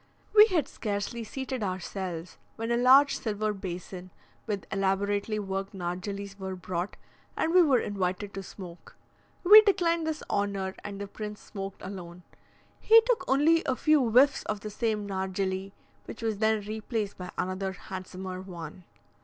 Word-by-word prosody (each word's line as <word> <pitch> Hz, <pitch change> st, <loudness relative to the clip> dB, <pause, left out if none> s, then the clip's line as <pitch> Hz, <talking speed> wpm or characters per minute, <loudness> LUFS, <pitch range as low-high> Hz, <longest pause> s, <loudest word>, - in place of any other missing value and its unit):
We 425 Hz, 0 st, +9 dB
had 350 Hz, -, +1 dB
scarcely 210 Hz, +2 st, -3 dB
seated 260 Hz, +2 st, -5 dB
ourselves, 185 Hz, -2 st, -4 dB, 0.2 s
when 225 Hz, +1 st, -3 dB
a -, -, +3 dB
large 265 Hz, +4 st, +6 dB
silver 215 Hz, -1 st, -1 dB
basin 185 Hz, -1 st, -7 dB, 0.4 s
with 205 Hz, -3 st, -3 dB
elaborately 200 Hz, +2 st, 0 dB
worked 195 Hz, -1 st, -4 dB
nargillys 195 Hz, +3 st, -5 dB
were 190 Hz, -1 st, -4 dB
brought, 180 Hz, +1 st, -4 dB, 0.4 s
and 325 Hz, -, +1 dB
we 365 Hz, -, +8 dB
were 285 Hz, -7 st, +5 dB
invited 195 Hz, -2 st, -2 dB
to 195 Hz, -, -5 dB
smoke. 180 Hz, -2 st, -11 dB, 0.5 s
We 420 Hz, +4 st, +11 dB
declined 340 Hz, -6 st, +1 dB
this 315 Hz, -1 st, -3 dB
honour, 200 Hz, -2 st, -1 dB
and 200 Hz, -1 st, -6 dB
the 200 Hz, -, -4 dB
prince 210 Hz, +1 st, -7 dB
smoked 195 Hz, -1 st, -8 dB
alone; 180 Hz, -2 st, -8 dB, 0.6 s
he 455 Hz, +1 st, +8 dB
took -, -, +1 dB
only 310 Hz, +5 st, +4 dB
a 260 Hz, -, +2 dB
few 305 Hz, 0 st, +3 dB
whiffs 260 Hz, +5 st, +5 dB
from 215 Hz, -, -1 dB
the 210 Hz, +1 st, -7 dB
same 215 Hz, -1 st, -1 dB
nargilly, 190 Hz, 0 st, -2 dB, 0.3 s
which 230 Hz, -, -9 dB
was 220 Hz, -3 st, -1 dB
then 220 Hz, -1 st, +2 dB
replaced 215 Hz, -1 st, -3 dB
by 180 Hz, 0 st, -6 dB
another 190 Hz, +1 st, -2 dB
handsomer 185 Hz, 0 st, -7 dB
one. 175 Hz, -2 st, -9 dB
200 Hz, 155 wpm, -28 LUFS, 190-235 Hz, 0.6 s, We